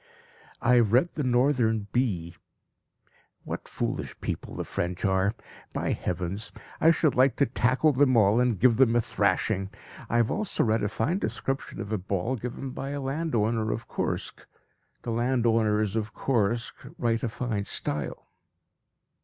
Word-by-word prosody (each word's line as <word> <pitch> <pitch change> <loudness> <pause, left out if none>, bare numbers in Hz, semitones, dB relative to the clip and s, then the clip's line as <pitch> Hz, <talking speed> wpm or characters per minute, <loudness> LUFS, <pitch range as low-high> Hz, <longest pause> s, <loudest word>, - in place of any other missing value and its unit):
I 125 0 +5
have 115 -3 +3
read 130 +8 +4
the 150 - -2
Northern 120 -4 +2
Bee. 95 -10 -1 1.1
What - - -6
foolish - - -4
people - - -5
the - - -3
French 90 +3 -3
are! 95 +1 +2 0.4
By - - -1
heavens! 90 +5 -3 0.3
I 160 - +6
should 160 -3 +3
like 130 +1 +4
to 140 - +3
tackle 130 +4 +2
them 130 -2 +4
all, 105 +1 +5
and 125 -5 +1
give 120 0 +5
them 120 -3 +4
a 120 - +4
thrashing. 95 -1 0 0.4
I 120 - +1
have 115 -2 +2
also 215 - 0
read 110 -1 +2
a 105 - 0
fine 150 - 0
description 135 -8 -3
of 110 -1 -5
a 110 - 0
ball 100 +6 -1
given 125 +3 -5
by 135 - -5
a 145 0 -3
landowner 120 -7 0
of 115 - -4
Kursk. - - -3 0.6
The 115 - -3
landowners 115 -3 +2
of 110 -1 -2
Kursk 115 -2 0 0.2
write 115 -6 0
a 120 - -1
fine 110 -3 -3
style. 75 -7 -4
115 Hz, 155 wpm, -27 LUFS, 105-130 Hz, 1.1 s, I